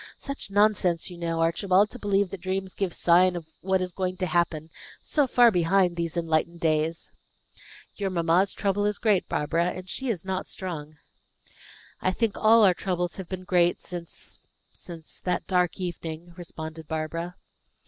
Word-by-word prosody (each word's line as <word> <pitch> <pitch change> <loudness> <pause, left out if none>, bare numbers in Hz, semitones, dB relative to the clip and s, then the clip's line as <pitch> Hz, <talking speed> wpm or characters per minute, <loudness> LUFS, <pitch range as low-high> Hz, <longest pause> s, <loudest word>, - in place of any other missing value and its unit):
Such 275 -7 -6
nonsense, 195 -4 +2
you 175 - -9
know, 165 -1 -1
Archibald, 185 +5 +3
to 250 - -9
believe 200 -2 +1
that 195 - -6
dreams 190 0 -3
give 195 -3 -1
signs 180 +2 +4
of 170 -2 -5 0.2
what 190 0 +1
is 180 - -4
going 185 0 -2
to 185 - -1
happen, 165 -2 0 0.3
so 290 -3 +1
far 240 -1 +6
behind 180 0 +3
these 170 0 -3
enlightened 165 0 0
days!" 160 0 0 0.9
"Your 200 -2 -1
mamma's 175 +2 +2
trouble 205 0 +1
is 210 - -1
great, 210 -5 +2
Barbara; 165 +3 0
and 185 +1 -4
she 265 +8 -3
is 190 -6 -2
not 190 0 -3
strong." 155 -5 -6 1.0
"I 185 - +2
think 225 0 0
all 225 +1 +5
our 190 -3 +6
troubles 180 -1 -2
have 190 -3 -7
been 185 -1 -5
great 175 -1 +2
since 175 -2 -7 0.3
since 165 -2 -10
that 180 -1 -2
dark 180 -1 +1
evening," 170 -1 -5
responded 160 -2 -8
Barbara. 165 +2 -3
180 Hz, 165 wpm, -26 LUFS, 170-195 Hz, 1.0 s, far